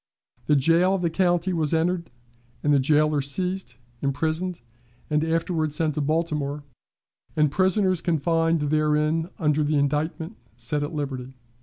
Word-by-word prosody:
The 150 Hz, -, +4 dB
jail 165 Hz, +7 st, +3 dB
of 185 Hz, -, -3 dB
the 170 Hz, -, +1 dB
county 175 Hz, +1 st, +1 dB
was 160 Hz, -1 st, +1 dB
entered, 170 Hz, 0 st, 0 dB, 0.5 s
the 145 Hz, -1 st, +4 dB
jailer 150 Hz, +1 st, +2 dB
seized, 180 Hz, 0 st, -2 dB, 0.3 s
imprisoned, 160 Hz, +5 st, -1 dB, 0.5 s
and 150 Hz, 0 st, +2 dB
afterward 165 Hz, -1 st, 0 dB
sent 155 Hz, -1 st, 0 dB
to 150 Hz, -, -2 dB
Baltimore, 150 Hz, -1 st, -1 dB, 0.7 s
and 150 Hz, -2 st, +3 dB
prisoners 185 Hz, 0 st, +2 dB
confined 165 Hz, 0 st, +1 dB
therein 155 Hz, +2 st, +1 dB
under 150 Hz, -2 st, +1 dB
indictment 150 Hz, +5 st, -1 dB, 0.2 s
set 125 Hz, +5 st, -2 dB
at 145 Hz, -, -3 dB
liberty. 130 Hz, -3 st, -5 dB
155 Hz, 130 wpm, -24 LUFS, 145-170 Hz, 0.7 s, The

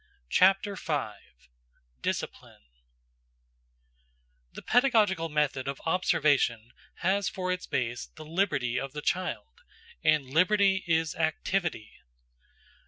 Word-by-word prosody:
CHAPTER 195 Hz, +2 st, +4 dB
V 150 Hz, -, -2 dB, 0.9 s
DISCIPLINE -, -, -4 dB, 1.9 s
THE -, -, -9 dB
pedagogical 215 Hz, -9 st, +3 dB
method 150 Hz, -3 st, 0 dB
of 140 Hz, 0 st, -4 dB
observation 145 Hz, -9 st, +1 dB, 0.3 s
has 195 Hz, +1 st, +2 dB
for 185 Hz, -1 st, -3 dB
its 180 Hz, 0 st, -3 dB
base 120 Hz, -2 st, -2 dB
the 155 Hz, -, -13 dB
liberty 150 Hz, -8 st, 0 dB
of 135 Hz, 0 st, -6 dB
the 150 Hz, 0 st, -6 dB
child; 185 Hz, -, -3 dB, 0.4 s
and 155 Hz, -2 st, +3 dB
liberty 190 Hz, +7 st, +3 dB
is 160 Hz, -2 st, +1 dB
activity. 165 Hz, -, -2 dB
165 Hz, 100 wpm, -28 LUFS, 140-190 Hz, 1.9 s, CHAPTER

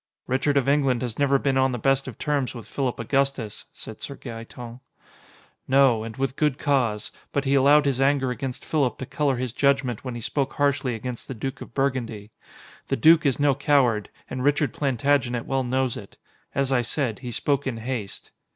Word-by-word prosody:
"Richard 135 Hz, +3 st, +1 dB
of 135 Hz, -, +2 dB
England 135 Hz, -3 st, +2 dB
has 120 Hz, -1 st, -4 dB
never 140 Hz, -1 st, +4 dB
been 135 Hz, -1 st, +1 dB
on 130 Hz, -1 st, +2 dB
the -, -, -1 dB
best 135 Hz, +3 st, +1 dB
of 125 Hz, -, -7 dB
terms 140 Hz, -4 st, -1 dB
with 115 Hz, -, -8 dB
Philip 130 Hz, -3 st, -2 dB
Augustus," 135 Hz, -2 st, -1 dB
said -, -, -10 dB
Sir -, -, -6 dB
Gaeton. 115 Hz, +1 st, -9 dB, 0.9 s
"No, 130 Hz, -4 st, +4 dB
and 115 Hz, +1 st, -7 dB
with 135 Hz, -1 st, -1 dB
good 150 Hz, -3 st, +1 dB
cause. 120 Hz, -8 st, 0 dB, 0.2 s
But 140 Hz, 0 st, -1 dB
he 135 Hz, -, +2 dB
allowed 145 Hz, +2 st, +5 dB
his 135 Hz, -2 st, +1 dB
anger 135 Hz, -2 st, +2 dB
against 130 Hz, 0 st, -5 dB
Philip 140 Hz, -6 st, 0 dB
to 130 Hz, -, -5 dB
color 145 Hz, -1 st, 0 dB
his 125 Hz, -1 st, -3 dB
judgment 135 Hz, -4 st, +1 dB
when 125 Hz, -2 st, -5 dB
he 120 Hz, -, -6 dB
spoke 135 Hz, +4 st, -1 dB
harshly 140 Hz, -4 st, +1 dB
against 120 Hz, +2 st, -6 dB
the 135 Hz, -, -5 dB
Duke 135 Hz, +4 st, -5 dB
of -, -, -10 dB
Burgundy. 120 Hz, -6 st, -2 dB, 0.6 s
The -, -, 0 dB
Duke 160 Hz, +4 st, +6 dB
is 135 Hz, -, +1 dB
no 145 Hz, -1 st, +4 dB
coward, 130 Hz, -6 st, +2 dB, 0.2 s
and 130 Hz, 0 st, -4 dB
Richard 145 Hz, -2 st, +2 dB
Plantagenet 130 Hz, -3 st, +1 dB
well 135 Hz, 0 st, 0 dB
knows 130 Hz, 0 st, 0 dB
it. 100 Hz, -, -10 dB, 0.4 s
As 135 Hz, -1 st, +1 dB
I 130 Hz, -2 st, +3 dB
said, 120 Hz, -1 st, -2 dB
he 125 Hz, -, -6 dB
spoke 140 Hz, +4 st, 0 dB
in 125 Hz, -3 st, -2 dB
haste." 115 Hz, -3 st, -5 dB
130 Hz, 195 wpm, -25 LUFS, 120-140 Hz, 0.9 s, Duke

